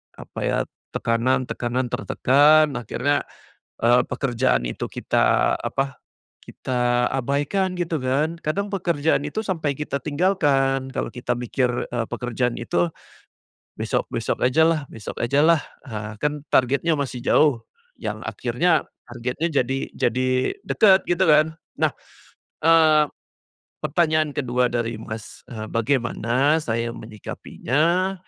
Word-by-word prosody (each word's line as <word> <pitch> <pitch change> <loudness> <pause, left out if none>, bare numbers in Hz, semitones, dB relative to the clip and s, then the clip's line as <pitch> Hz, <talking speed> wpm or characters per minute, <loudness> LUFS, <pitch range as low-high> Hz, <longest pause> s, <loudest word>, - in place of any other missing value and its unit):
apa - - -9
ya, - - +1 0.4
tekanan-tekanan 125 +1 0
tertekan, 150 +3 +4
akhirnya, 145 +5 -1 0.5
eee, 120 +2 +4
pekerjaan 125 - 0
itu - - -5
kita - - +2
apa, 135 -1 -3 0.4
kita 125 -1 0
abaikan 145 +9 0
gitu 170 -4 -2
kan 140 +5 0
kadang 190 +7 -1
pekerjaan 160 -6 +1
itu 150 +10 -4
sampai 155 -7 -1
kita 145 -2 -3
tinggalkan 145 -4 +1
kalau - - -2
kita 125 0 -2
mikir, 125 +1 -1 0.2
eee, 120 -2 -2
pekerjaan 120 0 -2
itu, 85 -7 0 0.9
besok-besok - - -2
ajalah 160 +4 +3
besok 110 - -8
ajalah, 145 +6 +4 0.3
ah, 105 -2 -6
kan 150 +1 -2
targetnya 140 +5 +2
masih 130 -3 -3
jauh, 145 -7 +3 0.3
yang - - -5
akhirnya 175 -2 +1 0.2
targetnya 125 +6 -3 0.2
jadi 135 +2 -2 0.2
jadi 130 +2 +1 0.4
dekat 195 -4 +5
gitu 175 +2 +2
kan? 155 +1 +4 0.2
Nah, - - +2 0.7
eee, 155 -2 +6 0.8
pertanyaan 155 0 +2
ke-2 125 -2 +1
dari 115 -2 -2
Mas, 110 -1 -8
eee, 110 -3 -6
bagaimana 125 +4 +1
saya 115 -2 -2
menyikapinya, 155 - -1
135 Hz, 110 wpm, -23 LUFS, 120-155 Hz, 0.9 s, eee